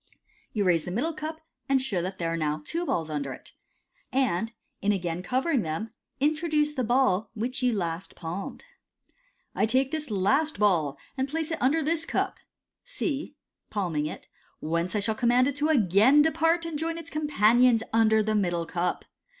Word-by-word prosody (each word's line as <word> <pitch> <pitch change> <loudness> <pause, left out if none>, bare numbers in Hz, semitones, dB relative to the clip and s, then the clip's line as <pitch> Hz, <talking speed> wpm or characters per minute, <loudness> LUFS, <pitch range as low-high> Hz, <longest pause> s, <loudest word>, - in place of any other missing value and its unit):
You 210 - 0
raise 170 -4 +2
the - - -4
middle 255 - -1
cup, 315 +1 -6 0.3
and 270 -1 +4
show 225 -9 -1
that 190 +2 -4
there 165 -1 -1
are - - 0
now 155 -1 -1
two 340 +1 -3
balls 160 -2 -1
under 140 -3 -3
it, - - -12 0.6
and, 225 -5 +1 0.3
in 205 - +2
again 175 -3 -2
covering 260 - +1
them, 165 +7 -4 0.3
introduce 300 +1 +1
the 265 -4 -2
ball 240 -4 +2
which 250 +4 -3
you 250 -1 +3
last 175 -4 -3
palmed. 175 +3 -6 0.5
" - - -41
I - - +1
take 260 +4 +2
this 310 -3 -3
last 265 +10 +1
ball, 170 -9 +2 0.2
and 265 +1 -1
place 320 +2 -2
it 325 - -3
under 310 +5 +3
this 325 +2 -1
cup - - -1 0.4
"(C) 320 - -3 0.2
— - - -56
palming 160 -6 0
it - - -8 0.2
— - - -37
u 155 - -4
whence 170 +4 0
I - - +2
shall 220 +2 +1
command 245 +2 +3
it 285 - -2
to 300 +2 +1
again 240 - +5
depart, 325 +2 +2
and 320 -3 -4
join 330 +1 -2
its 335 0 -7
companions 245 -5 +4
under 220 -1 +4
the 215 +1 0
middle 175 -5 0
cup. 175 +1 -2
235 Hz, 190 wpm, -27 LUFS, 180-300 Hz, 0.6 s, again